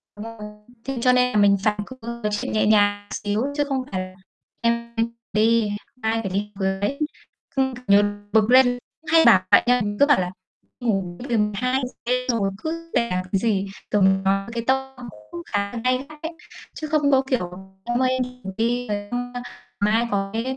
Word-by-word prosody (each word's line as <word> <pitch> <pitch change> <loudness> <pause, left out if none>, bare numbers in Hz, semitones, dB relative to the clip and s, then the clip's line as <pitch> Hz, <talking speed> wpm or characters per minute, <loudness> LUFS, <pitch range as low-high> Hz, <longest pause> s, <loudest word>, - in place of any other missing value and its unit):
Đúng 210 - -8
rồi. 230 0 -9 0.5
Thế 270 -2 -3
cho 250 0 +5
nên 250 0 +3
là - - +2
mình 200 -1 +5
phải 210 -1 +1
có 260 - -11 0.3
thật 210 - +1
sự 205 - -2
nhẹ 215 - +1
nhàng 205 -1 +3
xíu 205 +2 -1
chứ 290 - +2
không 265 -1 0
phải 185 -1 -1
là 185 0 -8 0.5
em 235 0 0 0.4
đi, 220 0 +3 0.3
ai 225 +1 0
phải 195 -3 -4
đi 210 +1 -2
với. 195 +7 -1 0.6
Cứ 265 -1 +1
như 200 +1 +6 0.3
bực 220 0 +3
lên 260 0 +8
cứ 245 0 0 0.3
hay 325 0 +6
bảo - - +7
vậy - - +8
á, 245 0 +3
mình 205 0 -3
cứ 285 - +7
bảo 290 -8 +4
là 180 0 -3 0.5
"Ngủ 195 -7 -1
đi, 250 - -7
tầm 210 -1 +2
2:00 255 +2 -1
đêm 250 +1 0
rồi 200 -5 +1
cứ 330 +5 -5
làm 185 -6 +1
cái 195 - +2
gì", 200 -3 0 0.2
rồi 205 -1 +3
mình 190 0 +4
nói 195 +1 +1
với 235 - -9
cái 230 -1 -2
tông 265 -2 -1 0.2
cũng 170 - -6
khá 200 0 -1
là 235 - -3
gay 255 +2 +1
gắt 305 -1 -13
đấy. 325 - -3 0.4
Chứ 310 - -5
không 295 -2 +2
có 265 0 +5
kiểu: 180 -9 0 0.3
"em 240 +1 -1
ơi, 255 - +3
em 260 0 0
đi 250 - -7
ngủ 190 - -6
đi, 240 +2 0
rồi 205 -1 -1
xong 245 0 -3 0.5
mai 220 +3 +2
có 195 -1 0
cái" 225 +1 -1
230 Hz, 215 wpm, -23 LUFS, 205-255 Hz, 0.6 s, lên